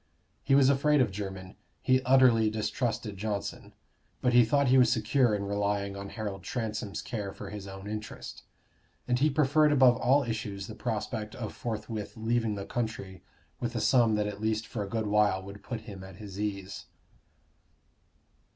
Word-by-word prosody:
He 135 - +3
was 140 -2 +6
afraid 140 +2 +3
of 120 -6 +3
Jermyn; 95 -1 -6 0.2
he 130 0 +3
utterly 125 -4 +5
distrusted 110 0 -2
Johnson; 105 0 -4 0.5
but 125 - +1
he 120 0 +8
thought 140 +3 +2
he 130 +1 +6
was 125 -2 +5
secure 115 0 +2
in 100 - -3
relying 100 0 -1
on 100 0 -6
Harold 105 -4 -5
Transome's 110 -1 -4
care 105 -6 -4
for - - -9
his 105 -2 -7
own 95 +1 -8
interest; 105 0 -6 0.7
and 125 0 +1
he 150 +3 +4
preferred 150 +1 +3
above 130 -4 +6
all 140 +3 +3
issues 105 -4 -4
the 110 - -8
prospect 110 -2 -3
of 115 -4 -5
forthwith 110 -1 -5
leaving 115 -1 0
the 100 -1 -5
country 110 -5 -4 0.4
with 120 0 -3
a - - 0
sum 115 -1 +4
that 105 0 +1
at 105 0 -5
least 110 0 0
for 110 - -5
a 100 - -4
good 110 0 -1
while 105 -2 +2
would 100 +1 -10
put 115 -3 -5
him 100 -4 -9
at 95 -1 -11
his 100 -1 -9
ease. 100 -2 -4
110 Hz, 175 wpm, -29 LUFS, 100-125 Hz, 0.7 s, he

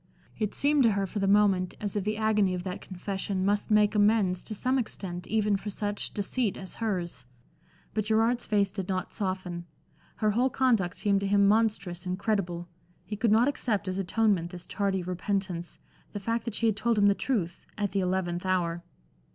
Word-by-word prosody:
It 215 -2 -1
seemed 290 0 +3
to 230 -4 +5
her 200 0 0
for 200 +2 -4
the 195 - +1
moment 195 -3 +3
as 205 -1 -3
if 205 - 0
the 210 +1 -1
agony 210 -4 +2
of 180 - -4
that 185 0 -5
confession 190 0 -3
must 205 +2 +1
make 210 -1 +4
amends 205 -3 +3
to 215 - -4
some 255 +5 +1
extent 180 -6 -5
even 210 -2 +2
for 200 +2 -6
such 205 0 -3
deceit 210 +1 -1
as 190 -2 -5
hers. 175 - -2 0.7
But 215 -1 -1
Gerard's 225 +3 +2
face 200 -2 +2
did 195 -2 -5
not 185 -1 -2
soften. 185 -3 -3 0.5
Her 215 -1 +1
whole 245 +5 +2
conduct 230 -9 +1
seemed 200 -1 +2
to 200 - -2
him 200 0 +4
monstrous, 200 -5 +1
incredible. 180 -2 -1 0.4
He 210 +4 -4
could 225 +1 +1
not 225 +4 +5
accept 220 -8 -1
as 185 +1 -2
atonement 195 -2 +1
this 175 -1 -7
tardy 195 -2 -1
repentance, 180 -1 -3 0.4
the 205 - -3
fact 230 +3 -2
that 230 -3 -3
she 230 - 0
had 220 -3 +3
told 230 +2 +1
him 205 - +4
the 200 - +6
truth 200 -7 -2 0.2
at 205 -2 -1
the 200 - 0
eleventh 180 -2 -1
hour. 175 -2 0
200 Hz, 190 wpm, -28 LUFS, 185-215 Hz, 0.7 s, the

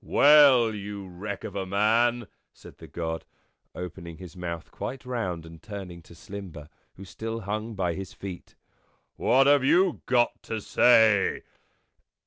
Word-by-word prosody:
" - - -31 0.2
Well, 140 -6 +7
you 100 -1 -7
wreck 95 +3 -7
of - - -7
a 95 -1 -3
man," 115 +4 +2 0.3
said - - -15
the - - -11
God, 80 -1 -4 0.5
opening 85 -2 -8
his 90 -4 -11
mouth 85 -2 -6
quite 130 0 -6
round, 95 -10 -3
and 80 0 -13
turning 95 -5 -8
to 85 - -16
Slimber, 85 -4 -9 0.3
who 95 - -11
still 115 +4 -6
hung 110 +2 -4
by 90 -3 -1
his 95 +1 -7
feet, 95 -3 -9 0.6
"what 135 +2 +3
have 140 -1 +5
you 175 +5 +3
got 120 -2 +2
to 110 - -4
say?" 110 -2 +4
100 Hz, 150 wpm, -26 LUFS, 90-120 Hz, 0.6 s, Well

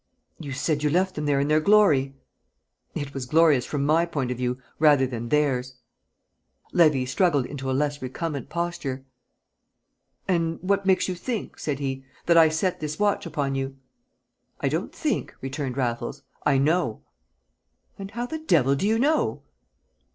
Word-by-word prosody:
"You 145 -4 -7
said 145 +2 -1
you 150 - +2
left 185 +4 +1
them 150 -1 -3
there 140 -1 +2
in 140 - +1
their 155 +1 +4
glory." 155 -8 +4 0.8
"It 140 -1 -4
was 130 -2 -5
glorious 155 -3 +4
from 140 -2 -1
my 160 +3 +4
point 135 -7 -2
of 125 - -3
view 125 0 -1 0.2
rather 145 -3 +5
than 120 -2 -5
theirs." 130 -4 +1 1.0
Levy 150 -7 +4
struggled 145 -1 +2
into 135 -1 -5
a - - +1
less 145 +1 -1
recumbent 140 +2 -4
posture. 165 -6 -3 1.2
"And 165 -3 0
what 200 +1 +1
makes 190 -1 +3
you 185 - -1
think," 220 +5 -5
said 145 -3 -2
he, 135 -1 -3 0.2
"that 170 - +4
I 165 -1 +7
set 165 +4 -1
this 155 0 -4
watch 205 -3 +1
upon 145 -4 -2
you?" 135 0 -3 0.8
"I - - 0
don't - - -2
think," 305 -3 -2
returned 135 -1 -4
Raffles. 120 -2 -2 0.2
"I 140 -2 +4
know." 145 -4 +1 1.0
"And 195 0 -6
how 235 +4 -4
the 315 +6 -5
devil 155 - +3
do 165 +9 0
you 220 +1 +2
know?" 295 +6 +1
150 Hz, 165 wpm, -25 LUFS, 135-175 Hz, 1.2 s, I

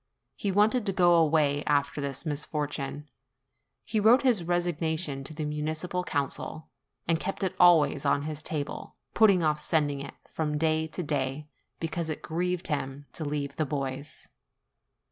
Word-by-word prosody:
He 200 - -1
wanted 215 +5 +3
to 195 - 0
go 175 -2 +5
away 155 -3 +3
after 145 0 +1
this 140 +2 -4
misfortune; 150 -1 -3 0.8
he 215 - 0
wrote 225 +6 +6
his 240 -9 +3
resignation 165 -4 -1
to 135 - -9
the 155 -1 -3
Municipal 155 +4 -2
Council, 145 0 -3 0.4
and 165 -1 +2
kept 195 +3 -3
it 190 - 0
always 175 -4 +5
on 140 0 +2
his 155 0 -4
table, 150 -2 -4 0.2
putting 200 -5 +5
off 150 -1 +2
sending 150 -2 +1
it 140 0 -7 0.2
from 150 -2 -1
day 160 0 +1
to 175 +3 -5
day, 145 0 -2 0.3
because 165 0 -3
it 155 - -4
grieved 180 +2 -2
him 140 -2 -3
to 160 - -4
leave 145 -1 -3
the 155 - +2
boys. 140 0 -4
155 Hz, 155 wpm, -28 LUFS, 145-175 Hz, 0.8 s, wrote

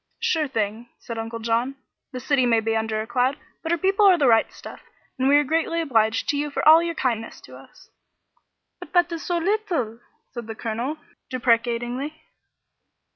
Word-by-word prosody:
"Sure 315 -3 0
thing," 225 -1 -3
said 230 -1 -7
Uncle 225 +1 -5
John. 230 +4 -1 0.4
"The 255 - -5
city 260 -1 +1
may 230 -1 +4
be 225 0 -1
under 220 -1 -1
a - - -5
cloud, 250 +4 0 0.2
but 325 - -3
her 340 - +2
people 390 +4 +3
are 370 -2 +6
the 290 - +2
right 225 -2 +4
stuff, - - -11 0.4
and 260 +1 +2
we 285 - +5
are 295 - +5
greatly 325 +3 0
obliged 225 -8 +1
to 285 - +1
you 295 +1 -1
for 285 - -1
all 320 +1 +9
your 335 0 -3
kindness 230 -5 -2
to - - -13
us." - - -17 0.9
"But - - -12
that 350 -1 +3
is 335 -1 -4
so 350 - -1
little!" 340 - -1 0.3
said 240 -3 -7
the 225 - -6
colonel, 235 +8 -3 0.3
deprecatingly. 245 +4 0
255 Hz, 185 wpm, -23 LUFS, 230-320 Hz, 0.9 s, all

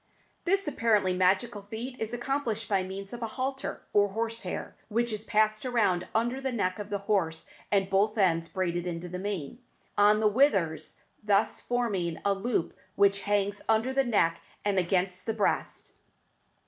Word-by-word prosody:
This 390 0 +1
apparently 215 -9 +2
magical 195 +4 +2
feat 225 +5 -6
is 220 - -3
accomplished 240 -2 -2
by 200 -3 +2
means 190 +2 -6
of 240 - -6
a 230 - -1
halter 265 +1 -3
of 205 -1 +4
horse 230 +1 -2
hair, 180 - -5
which 235 +1 0
is 215 +1 -5
passed 215 0 +2
round 220 -8 +1
under 240 +4 +1
the 265 -1 -1
neck 185 -5 -1
of 205 0 -6
the 205 - -1
horse 165 -6 0 0.2
and 195 -2 +3
both 205 +3 +2
ends 165 -5 +2
braided 175 -2 -1
into 170 0 -4
the 180 +1 -5
mane, 195 - -4 0.4
on 210 +1 +5
the 215 - +4
withers, 200 - +1 0.2
thus 205 0 +2
forming 200 -9 -1
a 200 - +4
loop 195 -2 -1 0.2
which 200 0 +4
hangs 205 0 +1
under 225 +4 +2
the 270 0 +3
neck 200 -9 +2 0.2
and 200 -2 +2
against 180 +1 0
the 225 - +1
breast. 210 - -1
205 Hz, 170 wpm, -29 LUFS, 190-230 Hz, 0.4 s, on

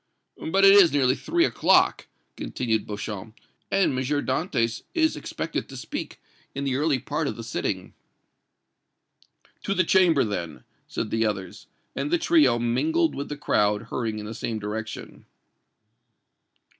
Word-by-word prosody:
But 195 +3 +4
it 195 - +9
is 195 -5 +7
nearly 130 -3 +3
three 340 - +1
o'clock," - - +3 0.3
continued 110 -4 -2
Beauchamp, 105 +1 -6 0.3
"and 195 - +2
M. 130 - -3
Dantès 130 -3 -1
is 320 -2 +2
expected - - -4
to - - -9
speak - - -6 0.4
in 140 - -3
the 135 -2 0
early 145 0 +2
part 150 +4 -3
of - - -3
the 115 - -7
sitting." 95 -4 -3 1.7
"To 195 - -2
the 185 - +3
Chamber, 170 -5 +4
then," 85 -7 -4 0.2
said 110 - -4
the 115 0 +2
others, 100 -3 -5 0.3
and - - -2
the 345 - +3
trio 330 - +4
mingled 315 - +1
with 140 - -5
the 145 - -5
crowd 105 -5 +1
hurrying 115 -3 -2
in 105 - -6
the 110 - -6
same 115 0 -3
direction. 110 +1 -6
130 Hz, 145 wpm, -25 LUFS, 110-180 Hz, 1.7 s, it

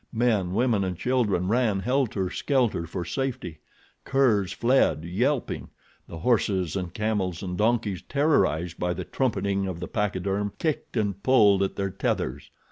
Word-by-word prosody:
Men, 110 -6 +1
women 115 -3 +2
and 90 -2 -3
children 110 -8 +1
ran 110 -3 +1
helter 120 -7 0
skelter 120 - 0
for 85 +1 -4
safety. 125 - -3 0.4
Curs 110 -9 +2
fled, 120 - +2
yelping. 125 +10 -1 0.4
The 85 - -8
horses 95 -4 +1
and 90 -3 -3
camels 105 -5 -2
and 90 -1 -3
donkeys, 105 -2 0
terrorized 90 - +1
by 90 0 -1
the 90 0 -5
trumpeting 100 -3 -1
of 90 -3 -5
the 90 - -5
pachyderm, 100 0 -1
kicked 155 -5 -2
and 100 -2 -1
pulled 105 -7 +5
at 95 - -1
their 95 -1 -2
tethers. 70 -7 -2
100 Hz, 145 wpm, -26 LUFS, 90-120 Hz, 0.4 s, pulled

